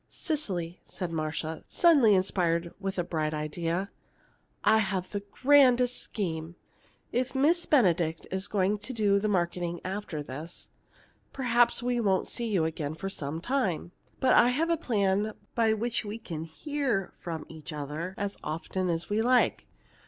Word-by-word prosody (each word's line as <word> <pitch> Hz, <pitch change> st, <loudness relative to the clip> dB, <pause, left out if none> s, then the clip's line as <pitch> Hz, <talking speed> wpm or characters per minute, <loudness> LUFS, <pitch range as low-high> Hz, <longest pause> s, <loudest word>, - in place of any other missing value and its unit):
"Cecily," 190 Hz, -, -3 dB
said 180 Hz, -3 st, -5 dB
Marcia, 160 Hz, 0 st, -3 dB
suddenly 280 Hz, -, +5 dB
inspired 175 Hz, -3 st, +1 dB
with 195 Hz, -1 st, -3 dB
a 175 Hz, -, +1 dB
bright 155 Hz, -3 st, -1 dB
idea. 165 Hz, +5 st, -2 dB, 0.7 s
"I 220 Hz, +1 st, +5 dB
have 190 Hz, -3 st, -1 dB
the 205 Hz, -, -2 dB
grandest 250 Hz, +3 st, +4 dB
scheme! 165 Hz, -4 st, -4 dB, 0.6 s
If 255 Hz, +2 st, -1 dB
Miss 325 Hz, +6 st, +3 dB
Benedict 175 Hz, -, +3 dB
is 190 Hz, +1 st, -2 dB
going 205 Hz, +1 st, +1 dB
to 210 Hz, +6 st, -6 dB
do 205 Hz, -3 st, +3 dB
the 215 Hz, -, 0 dB
marketing 175 Hz, -3 st, -1 dB
after 185 Hz, -5 st, -4 dB
this, 150 Hz, +6 st, -7 dB, 0.6 s
perhaps 240 Hz, -2 st, +3 dB
we 245 Hz, 0 st, +1 dB
won't 195 Hz, -4 st, +1 dB
see 235 Hz, -, -3 dB
you 190 Hz, -7 st, +1 dB
again 155 Hz, -2 st, -3 dB
for 195 Hz, +4 st, -5 dB
some 155 Hz, -1 st, -4 dB
time. 190 Hz, -, -1 dB, 0.3 s
But 260 Hz, -, +4 dB
I've 275 Hz, +8 st, +4 dB
a -, -, +4 dB
plan 210 Hz, -, 0 dB, 0.2 s
by 225 Hz, -2 st, +3 dB
which 230 Hz, +1 st, -1 dB
we 210 Hz, +1 st, -5 dB
can 165 Hz, -8 st, -6 dB
hear 245 Hz, -, -2 dB
from 165 Hz, -3 st, -5 dB
each 160 Hz, 0 st, -9 dB
other 150 Hz, +5 st, -5 dB
as 200 Hz, 0 st, -2 dB
often 180 Hz, +4 st, -2 dB
as 165 Hz, 0 st, -1 dB
we 210 Hz, +2 st, +1 dB
like. 250 Hz, +1 st, +3 dB
195 Hz, 150 wpm, -29 LUFS, 165-235 Hz, 0.7 s, suddenly